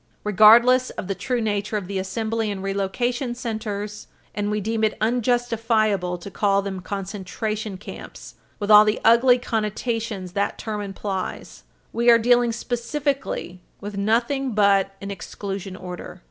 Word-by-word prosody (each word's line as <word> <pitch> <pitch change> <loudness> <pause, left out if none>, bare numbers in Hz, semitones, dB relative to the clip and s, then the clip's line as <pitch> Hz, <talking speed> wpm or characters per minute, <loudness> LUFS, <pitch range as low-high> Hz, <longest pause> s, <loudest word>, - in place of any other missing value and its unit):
Regardless 235 +5 +6
of - - -6
the 195 - -1
true 245 +4 -2
nature 210 0 -1
of 200 - -4
the 195 +1 -3
assembly 220 +3 -2
and 195 -2 -4
relocation 240 +6 -1
centers 215 -3 -5 0.3
and 205 0 -2
we 210 0 0
deem 220 +2 -2
it 215 - +1
unjustifiable 225 -5 +1
to 185 +3 -10
call 200 -1 +1
them 195 -1 -4
concentration 200 +2 -4
camps, - - -10 0.2
with 205 0 -1
all 210 0 +10
the 215 0 0
ugly 245 +2 +6
connotations 220 -4 -3
that 200 +2 -1
term 215 -2 -4
implies 195 -1 -5 0.3
we 235 +1 +3
are 235 - +8
dealing 240 +1 +3
specifically 245 -5 -3 0.2
with 205 0 -7
nothing 235 +6 0
but 200 -2 +3
an 200 0 -5
exclusion 195 -1 -6
order. 180 0 -8
210 Hz, 145 wpm, -23 LUFS, 200-235 Hz, 0.3 s, all